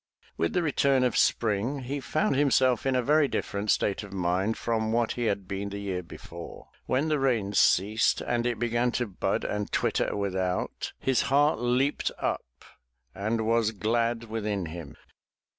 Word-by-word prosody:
With 85 - -1
the 180 - +1
return 140 -3 +2
of 125 - +1
spring, 115 +5 +1
he 140 +3 -3
found 155 +7 0
himself 130 -3 +3
in 135 - +2
a 125 - +2
very 150 +3 +4
different 100 -4 -3
state 100 -1 +1
of 105 -2 -10
mind 95 +3 0
from 110 -1 -1
what 115 0 +1
he 120 - -2
had 100 -3 -1
been 100 +1 -3
the 100 - -6
year 95 -3 -3
before. 85 0 -10 0.2
When 135 +5 +1
the 155 -2 +1
rains 110 -7 +1
ceased 105 +4 +3
and 120 0 -1
it 120 -2 -1
began 120 +1 +1
to 125 - 0
bud 100 -5 -2
and 105 0 -3
twitter - - 0
without, 95 -2 -2
his 135 -2 +1
heart 145 0 +3
leaped 125 +4 +1
up - - -4 0.5
and 110 +3 -1
was 115 -1 +2
glad 115 +3 0
within 105 -4 -3
him. 80 -2 -8
115 Hz, 170 wpm, -27 LUFS, 100-125 Hz, 0.5 s, very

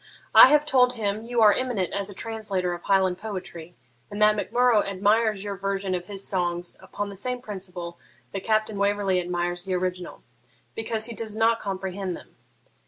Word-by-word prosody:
I - - +11
have 295 +2 +4
told 250 -4 +4
him 215 -1 -3
you 240 -2 +2
are 210 -1 +7
eminent 245 -9 -2
as 200 0 -1
a 200 - -9
translator 205 -6 -3
of 175 - -7
Highland 190 -2 +2
poetry, 180 -5 -7 0.3
and 205 - -6
that 210 0 +5
Mac 205 - -4
Murrough 240 -2 +4
admires 205 +1 +1
your 200 -1 -4
version 195 -1 -2
of 180 -1 -3
his 200 -1 -4
songs 175 -2 -2
upon 205 0 -5
the 200 - -8
same 250 +6 -3
principle 180 -6 -7 0.3
that 195 -1 -5
Captain 215 -1 0
Waverley 200 -2 +1
admires 175 0 -2
the 190 -1 -1
original, 180 -1 -4 0.5
because 225 0 -2
he 235 - -4
does 220 -1 -4
not 225 +1 +3
comprehend 190 -1 -4
them. - - -17
200 Hz, 180 wpm, -25 LUFS, 185-220 Hz, 0.5 s, I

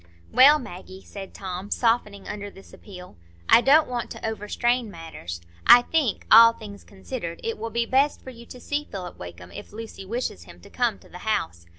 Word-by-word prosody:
"Well, 275 +5 +7
Maggie," 190 -6 -10
said 195 -2 -9
Tom, 190 +1 -7
softening 220 -4 0
under 205 -1 -6
this 195 -1 -17
appeal, 180 - -13 0.3
"I - - +7
don't 300 +5 +5
want 245 -1 -4
to - - -6
overstrain 225 +2 -1
matters. 160 - -8 0.3
I 245 - +9
think, 285 -7 -1
all 230 +1 +9
things 205 -3 -11
considered, 190 -3 -7
it 225 -1 -3
will 230 +1 -4
be 235 +1 -1
best 275 +4 +1
for 260 - -9
you 235 -1 -14
to 250 - -11
see 290 +4 -3
Philip 180 -3 -8
Wakem, 90 0 -10
if - - -10
Lucy 220 -2 -9
wishes 195 - -4
him 85 0 -14
to - - -16
come - - 0
to - - -20
the - - -11
house. 85 0 -3
210 Hz, 195 wpm, -24 LUFS, 185-240 Hz, 0.3 s, I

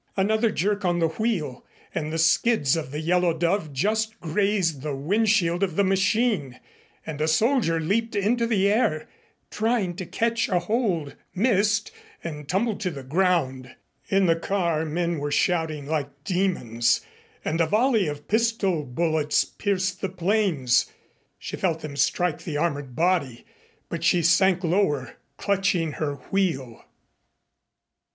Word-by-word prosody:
Another 220 +4 +2
jerk 205 +1 -1
on 175 -1 +1
the 165 -1 +2
wheel 170 - -2 0.3
and 155 -2 -3
the 165 - -2
skids 165 - +3
of 160 -3 -4
the 145 +3 -5
Yellow 175 0 +1
Dove 170 -1 0
just 220 +9 -1
grazed 175 -3 0
the 145 -1 -3
wind 205 +11 +1
shield 175 -4 +2
of 185 -5 0
the 200 - +3
machine, 190 - +1 0.5
and 150 -2 -5
a 155 - +2
soldier 215 - +2
leaped 215 +8 -1
into 230 +4 +1
the 200 -4 +2
air, 200 -8 +1 0.4
trying 215 -5 0
to 185 -3 -5
catch 230 0 0
a 185 - +2
hold, 175 - -1 0.2
missed 210 0 +2 0.3
and 150 -4 -7
tumbled 210 +3 0
to 195 -4 -1
the 140 -5 -8
ground. 135 -5 0 0.3
In 195 0 +3
the 165 -2 +4
car 170 -2 -1
men 170 +1 -1
were 145 +1 -2
shouting 160 -2 0
like 145 -2 -4
demons, 170 - +1 0.4
and 165 +2 0
a 165 - +2
volley 220 - +2
of 145 0 -6
pistol 220 -7 +1
bullets 155 +2 +1
pierced 190 -2 -2
the 195 - -1
planes. 180 - +1 0.5
She - - -6
felt 165 -4 -1
them 150 -2 -7
strike 155 +4 0
the 155 -4 -3
armored 145 -5 -2
body, 160 -8 0 0.4
but - - -5
she 175 -2 +3
sank 180 +2 +4
lower, 160 - 0 0.2
clutching 195 -5 0
her 145 -1 -3 0.2
wheel. 155 -12 -1
175 Hz, 145 wpm, -25 LUFS, 155-200 Hz, 0.5 s, the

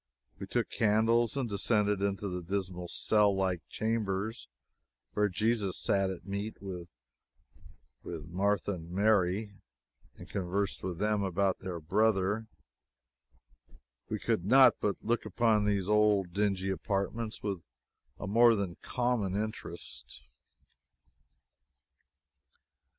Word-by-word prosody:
We - - -6
took - - -1
candles 115 +3 +2
and 130 -3 0
descended 105 -1 +1
to 100 0 -1
the 90 -1 -4
dismal 90 -1 -3
cell 105 +2 +3
like 95 -3 0
chambers 110 -1 -2 0.7
where 105 0 +2
Jesus 105 -1 0
sat 100 -1 +1
at 90 -2 -7
meat 100 +3 -4
with 90 -3 -7 1.2
Martha 90 +5 -1
and 85 -2 -8
Mary, 100 +1 +2 0.6
and - - -12
conversed 100 +1 -2
with 90 -2 -4
them 105 +2 +1
about 95 0 0
their 90 -2 -5
brother. 105 +4 +1 1.6
We - - -1
could 90 - -1
not 125 +2 +7
but 100 -2 -1
look 120 +2 0
upon 110 -3 +2
these 100 -2 0
old 105 -4 +3
dingy 95 -1 0
apartments 100 +4 -3
with 100 -5 -3 0.6
a - - -5
more 115 +3 +5
than 95 -4 -3
common 120 -6 -1
interest. 105 -5 -6
100 Hz, 110 wpm, -31 LUFS, 95-110 Hz, 1.6 s, not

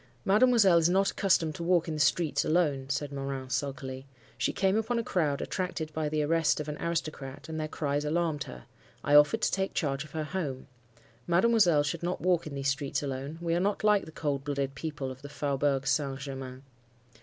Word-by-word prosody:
"'Mademoiselle 210 -4 +5
is 165 +1 +3
not 195 +2 +3
accustomed 165 -5 +2
to 170 - -8
walk 175 -1 +2
in 160 - -2
the 155 - -4
streets 150 +2 +2
alone,' 145 -5 +1
said 140 +1 -2
Morin, 135 -2 -5
sulkily. 135 0 -3 0.3
'She 120 0 0
came 195 0 +1
upon 225 +2 0
a 230 - 0
crowd 155 -9 0
attracted 180 -4 -3
by 155 -1 -1
the 155 0 0
arrest 160 0 +2
of 150 - -4
an 150 - -3
aristocrat, 155 -5 -4
and 160 0 -4
their 155 - -2
cries 145 -1 -2
alarmed 160 0 0
her. - - -10 0.4
I 145 - 0
offered 150 0 +6
to - - +2
take 195 0 -1
charge 140 -4 -1
of 150 - -15
her 155 -1 -2
home. 150 -6 -4 0.6
Mademoiselle 175 -4 +4
should 150 +3 -3
not 175 +1 -2
walk 175 -3 +1
in 145 - -6
these 135 0 -2
streets 140 +1 -2
alone. 140 +3 -4
We 165 -1 0
are 170 - +2
not 200 +3 0
like 210 -2 +4
the - - -11
cold 145 -3 -2
blooded 140 -1 -2
people 140 -1 -5
of 130 0 -11
the 145 - -9
Faubourg 140 -1 0
Saint 135 0 0
Germain. 135 -1 -7
150 Hz, 205 wpm, -29 LUFS, 140-170 Hz, 0.6 s, offered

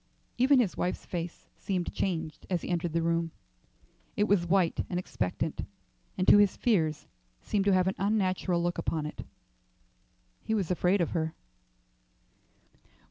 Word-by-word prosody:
Even 265 +2 +5
his 215 -7 +1
wife's 180 - -2
face 170 -1 -5
seemed 180 -3 -2
changed 165 -4 -3
as 180 -3 -1
he - - -5
entered 175 -1 -1
the 165 +1 0
room. 165 0 +1 0.9
It 205 - +3
was 195 -4 +2
white 180 -2 +2
and 180 - -2
expectant, 95 - -2 0.5
and 185 - 0
to 205 - +8
his 205 -2 +3
fears 160 -10 +1 0.4
seemed 200 -2 0
to 200 - +4
have 185 -1 +3
an 190 - +1
unnatural 185 -3 +1
look 175 0 -1
upon 155 -2 -1
it. 150 - -6 1.2
He 220 - -1
was 190 -5 -1
afraid 180 +2 +2
of 170 - 0
her. 160 -1 -2
180 Hz, 150 wpm, -29 LUFS, 165-195 Hz, 1.2 s, to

